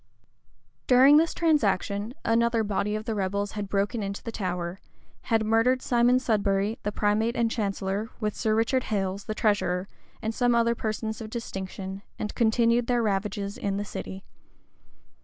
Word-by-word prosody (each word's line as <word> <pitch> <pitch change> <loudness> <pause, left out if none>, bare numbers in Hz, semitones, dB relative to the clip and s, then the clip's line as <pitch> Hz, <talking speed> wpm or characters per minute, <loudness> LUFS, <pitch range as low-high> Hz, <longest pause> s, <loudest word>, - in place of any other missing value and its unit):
[] - - -41
During 265 +3 +7
this 325 +1 +3
transaction, 220 - +1
another 230 0 +2
body 210 0 -1
of 215 0 -4
the 225 - -1
rebels 200 0 -1
had 205 -2 -5
broken 205 +3 0
into 200 0 -4
the 230 - -5
Tower; 180 -3 -3 0.5
had 225 -2 +1
murdered 230 +4 +3
Simon 245 +1 +4
Sudbury, 205 -3 0
the 210 - -2
primate 215 +3 +1
and 230 -1 +1
chancellor, 200 0 -2
with 210 -2 -2
Sir 215 -1 +1
Robert 235 +3 +1
Hales, 195 -2 -2
the 215 - -4
treasurer, 200 -4 +1 0.3
and 220 0 -3
some 245 0 +2
other 235 0 +3
persons 220 0 -3
of 215 - -6
distinction; 195 -4 -6 0.2
and 210 - -4
continued 235 +1 +2
their 245 -1 +2
ravages 200 -1 -2
in 200 -1 -1
the 205 - -3
city. 190 -1 -7
215 Hz, 160 wpm, -27 LUFS, 200-235 Hz, 0.5 s, During